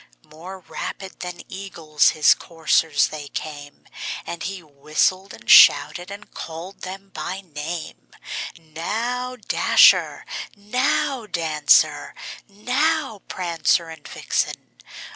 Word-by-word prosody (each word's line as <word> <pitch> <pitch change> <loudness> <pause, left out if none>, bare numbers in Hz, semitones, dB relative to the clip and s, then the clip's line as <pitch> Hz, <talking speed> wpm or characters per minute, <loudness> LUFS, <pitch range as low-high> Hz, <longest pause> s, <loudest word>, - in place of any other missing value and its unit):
More 185 +5 -11
rapid 190 +1 -7
than 180 -1 -7
eagles 165 -6 0
his 155 -1 +5
coursers 160 -2 +1
they 150 -1 -7
came, 145 -1 -8 0.4
And 170 - -6
he 190 -2 -5
whistled, 155 +6 -1
and - - -13
shouted, 180 +1 +7
and 200 +1 -11
called 170 +4 -8
them 195 +1 -8
by 185 +5 -5
name; 160 -1 -7 0.5
"Now, 225 +11 -4
Dasher! 235 - +4 0.3
now, 250 +4 0
Dancer! 155 -5 +2 0.3
now, 250 +3 -1
Prancer 170 -1 0
and 160 -3 -11
Vixen! - - -3
180 Hz, 105 wpm, -22 LUFS, 155-200 Hz, 0.5 s, shouted